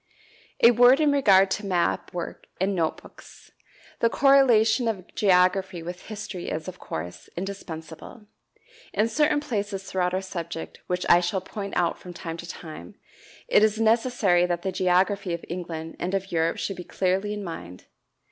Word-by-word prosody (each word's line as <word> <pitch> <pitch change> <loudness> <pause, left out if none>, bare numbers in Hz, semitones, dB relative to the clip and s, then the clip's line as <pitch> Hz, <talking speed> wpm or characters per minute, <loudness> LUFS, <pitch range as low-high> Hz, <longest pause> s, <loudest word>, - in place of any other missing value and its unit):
A 235 - +9
word 245 +3 +6
in 300 -2 +3
regard 195 -9 +5
to 210 - -2
map 180 -3 0
work 175 -1 -6
and 195 +2 +1
note 165 -4 -1
books. - - -16 0.5
The 230 - +3
correlation 245 -4 +4
of 195 -5 -4
geography 185 -2 +2
with 175 +1 -8
history 210 -4 -6
is, 155 +2 -4
of 185 0 -8
course, 85 +2 -7
indispensable. 175 +1 -7 0.7
In 210 +3 +2
certain 300 +4 +2
places 205 -9 -3
throughout 185 -1 -1
our 190 - -1
subject, 170 -3 -6
which 180 0 -2
I 175 - +7
shall 180 +2 -1
point 200 +1 -6
out 175 -1 +1
from 180 - -10
time 165 -2 -6
to 170 +1 -9
time, 155 - -9 0.5
it - - +5
is 215 0 +2
necessary 225 -6 +3
that 175 -1 -2
the 190 - -1
geography 185 +1 +1
of 170 - -10
England 165 -2 -6
and 185 +2 -2
of 195 0 -3
Europe 165 0 +1
should 195 - -3
be 180 - -6
clearly 190 +3 -1
in 205 - -5
mind. 90 - -8
190 Hz, 165 wpm, -25 LUFS, 175-210 Hz, 0.7 s, A